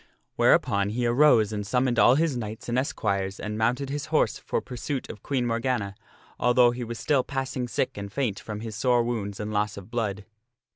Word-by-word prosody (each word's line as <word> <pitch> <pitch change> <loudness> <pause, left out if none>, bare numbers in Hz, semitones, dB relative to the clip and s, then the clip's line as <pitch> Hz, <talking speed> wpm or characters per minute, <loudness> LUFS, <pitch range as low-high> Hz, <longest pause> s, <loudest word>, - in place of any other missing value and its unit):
Whereupon 100 0 +3
he 120 +3 -1
arose 120 -4 +4
and 105 - -2
summoned 125 +3 +1
all 125 - +6
his 155 -2 +1
knights 110 0 -6
and 120 +1 +1
esquires 100 -8 -2
and 105 0 -4
mounted 125 +5 0
his 145 -1 -3
horse - - +1
for - - -2
pursuit 130 +2 -5
of 105 - -13
Queen 130 -4 -1
Morgana, 115 -3 -1 0.5
although 125 0 +5
he 120 0 -5
was 120 0 -5
still 140 -1 +1
passing 130 -1 -3
sick 115 - -2
and 100 0 -6
faint 115 -5 -1
from 105 -1 -6
his 110 -2 -6
sore 120 +2 +2
wounds 105 -4 -3
and 105 0 -4
loss 105 0 0
of 100 +2 -10
blood. 105 -4 -2
120 Hz, 195 wpm, -26 LUFS, 105-125 Hz, 0.5 s, all